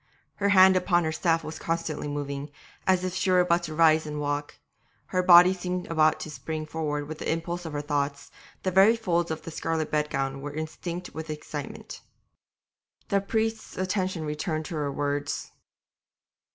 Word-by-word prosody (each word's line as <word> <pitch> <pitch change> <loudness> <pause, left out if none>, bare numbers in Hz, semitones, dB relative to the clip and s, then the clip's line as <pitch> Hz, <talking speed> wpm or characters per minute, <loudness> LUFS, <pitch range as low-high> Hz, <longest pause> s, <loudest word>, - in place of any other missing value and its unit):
Her 200 0 +1
hand 190 -1 +7
upon 180 -1 +2
her 160 - 0
staff 165 +1 +1
was 155 - -7
constantly 165 -3 -2
moving, 145 0 -4 0.4
as 185 -1 +3
if 185 -1 -2
she 185 +1 0
were 180 -1 +5
about 175 -1 +2
to 155 -1 -6
rise 160 -1 +4
and 150 0 -4
walk; 145 0 -3 0.5
her 185 - +1
body 180 0 +8
seemed 180 -1 -3
about 155 -1 +3
to 155 - -6
spring 155 0 -5
forward 150 -2 -3
with 155 0 -7
the - - -1
impulse 170 +2 -3
of 160 - -7
her 145 0 -3
thoughts, 145 -1 -2 0.3
the 185 - 0
very 195 +5 +6
folds 175 -7 0
of 160 0 -4
the 165 - -7
scarlet 160 -1 -2
bedgown 135 -3 -1
were 145 +1 -6
instinct 170 +3 -5
with 160 0 -6
excitement. 150 -2 -7 1.1
The 200 0 +2
priest's 220 +2 -2
attention 185 -3 -1
returned 155 +1 -2
to 165 - -5
her 145 -2 -1
words. 145 0 -2
160 Hz, 175 wpm, -27 LUFS, 150-180 Hz, 1.1 s, body